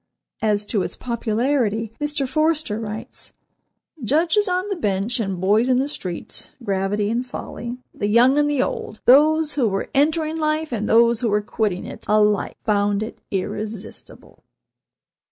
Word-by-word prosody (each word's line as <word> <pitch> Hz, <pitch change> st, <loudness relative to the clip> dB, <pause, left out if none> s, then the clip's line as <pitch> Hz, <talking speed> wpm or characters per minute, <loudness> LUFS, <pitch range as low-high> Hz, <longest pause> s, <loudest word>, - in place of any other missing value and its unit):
As 210 Hz, -1 st, +1 dB
to 205 Hz, -2 st, 0 dB
its -, -, -4 dB
popularity, 230 Hz, -1 st, 0 dB
Mr. 295 Hz, -2 st, 0 dB
Forster 310 Hz, -5 st, 0 dB
writes: 215 Hz, 0 st, -7 dB, 0.7 s
"Judges 330 Hz, -, +2 dB
on 365 Hz, +2 st, 0 dB
the 395 Hz, -, -1 dB
bench, 210 Hz, -, -1 dB
and 195 Hz, -4 st, -2 dB
boys 210 Hz, +7 st, +3 dB
in 255 Hz, -, +4 dB
the 270 Hz, +2 st, +1 dB
streets, 185 Hz, -, -6 dB
gravity 205 Hz, 0 st, 0 dB
and 240 Hz, +2 st, 0 dB
folly, 245 Hz, -1 st, -7 dB, 0.2 s
the 205 Hz, -, -2 dB
young 245 Hz, +6 st, +5 dB
and 295 Hz, 0 st, +2 dB
the 285 Hz, -3 st, +2 dB
old, 215 Hz, -, -5 dB
those 305 Hz, +4 st, +5 dB
who 265 Hz, -5 st, +2 dB
were 195 Hz, -1 st, -2 dB
entering 310 Hz, +2 st, +1 dB
life, 310 Hz, -1 st, -1 dB
and 215 Hz, -3 st, -2 dB
those 235 Hz, +1 st, +4 dB
who 235 Hz, -, +1 dB
were 210 Hz, 0 st, +1 dB
quitting 205 Hz, -3 st, -2 dB
it, -, -, -9 dB
alike 210 Hz, -1 st, +2 dB
found 205 Hz, -1 st, +1 dB
it 220 Hz, -, -8 dB
irresistible." 210 Hz, +2 st, -6 dB
230 Hz, 155 wpm, -22 LUFS, 210-290 Hz, 0.7 s, young